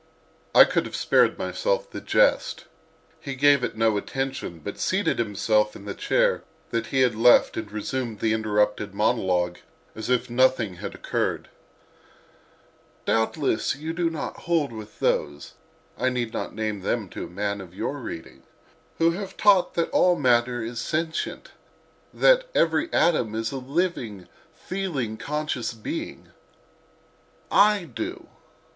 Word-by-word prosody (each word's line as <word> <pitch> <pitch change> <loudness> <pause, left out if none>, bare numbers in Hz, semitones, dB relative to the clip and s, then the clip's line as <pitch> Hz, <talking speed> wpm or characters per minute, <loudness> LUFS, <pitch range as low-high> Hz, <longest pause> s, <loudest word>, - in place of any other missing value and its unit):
I - - +11
could - - 0
have - - -7
spared - - +3
myself - - -1
the - - -6
jest; - - +2 0.5
he 140 -3 -6
gave 140 0 +4
it 125 - -3
no 110 -2 +2
attention, 135 -5 -4
but 80 - -7
seated - - 0
himself 105 0 +1
in 100 - -11
the 100 - -4
chair - - +1 0.3
that 115 - -1
he 135 - +1
had 125 -2 +4
left 115 +3 +5
and 110 -2 -5
resumed 110 +1 -3
the 110 -1 +1
interrupted 105 -2 0
monologue 90 -5 +1 0.3
as 110 - -6
if 125 0 +2
nothing 120 -6 +2
had - - -6
occurred: - - -2 1.6
"Doubtless 115 +3 +1
you 155 +3 -5
do 170 0 0
not 160 -2 -5
hold 160 -6 +2
with 110 -2 -10
those 70 0 -1 0.5
(I 130 - +2
need 120 -2 -2
not - - -4
name 110 -2 -3
them 105 +2 -1
to - - -6
a - - -11
man 100 +2 -3
of 90 -1 -12
your 140 +8 -3
reading) 85 -9 -8 0.6
who 165 0 +4
have 195 +2 -6
taught 200 -3 +4
that 170 - 0
all 180 -1 +4
matter 120 -4 +2
is 115 +1 -5
sentient, 160 +5 -3 0.6
that - - +4
every 320 +2 +2
atom 155 -10 +2
is 115 0 -2
a 135 - -4
living, 130 - -2 0.3
feeling, 155 - -3
conscious 150 -5 -3
being. 110 - -6 1.2
I 205 -2 +5
do. 115 -9 -6
120 Hz, 145 wpm, -25 LUFS, 110-155 Hz, 1.6 s, I